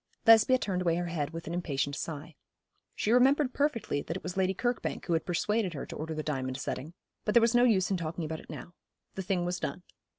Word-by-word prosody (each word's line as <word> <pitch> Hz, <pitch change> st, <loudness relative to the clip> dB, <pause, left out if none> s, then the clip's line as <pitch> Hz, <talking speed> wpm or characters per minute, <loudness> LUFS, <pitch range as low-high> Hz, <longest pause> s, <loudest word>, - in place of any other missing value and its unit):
Lesbia 225 Hz, +3 st, +7 dB
turned 190 Hz, -6 st, -2 dB
away 170 Hz, -2 st, +2 dB
her 175 Hz, +1 st, -1 dB
head 155 Hz, -4 st, -2 dB
with 165 Hz, +1 st, -7 dB
an 165 Hz, -, -4 dB
impatient 145 Hz, -5 st, -1 dB
sigh. 155 Hz, +1 st, -5 dB, 0.6 s
She 215 Hz, -, 0 dB
remembered 260 Hz, +2 st, +4 dB
perfectly 280 Hz, -, 0 dB
that 165 Hz, +5 st, -4 dB
it -, -, -11 dB
was 180 Hz, -, -5 dB
Lady 190 Hz, 0 st, +1 dB
Kirkbank 240 Hz, +4 st, -2 dB
who 175 Hz, -, 0 dB
had 160 Hz, -, 0 dB
persuaded 190 Hz, +1 st, 0 dB
her 140 Hz, -, -4 dB
to -, -, -8 dB
order 160 Hz, +1 st, -4 dB
the 155 Hz, -, -3 dB
diamond 130 Hz, -4 st, -2 dB
setting; 145 Hz, +3 st, -5 dB, 0.3 s
but 210 Hz, -, -1 dB
there -, -, +9 dB
was 230 Hz, +1 st, +3 dB
no 245 Hz, 0 st, +5 dB
use 200 Hz, -6 st, +3 dB
in 190 Hz, -, +2 dB
talking 165 Hz, 0 st, -4 dB
about 160 Hz, 0 st, -4 dB
it -, -, -15 dB
now. 175 Hz, -, -8 dB, 0.4 s
The 190 Hz, -, -4 dB
thing 180 Hz, -1 st, 0 dB
was 180 Hz, 0 st, -2 dB
done. 140 Hz, +6 st, -4 dB
175 Hz, 235 wpm, -30 LUFS, 160-220 Hz, 0.6 s, there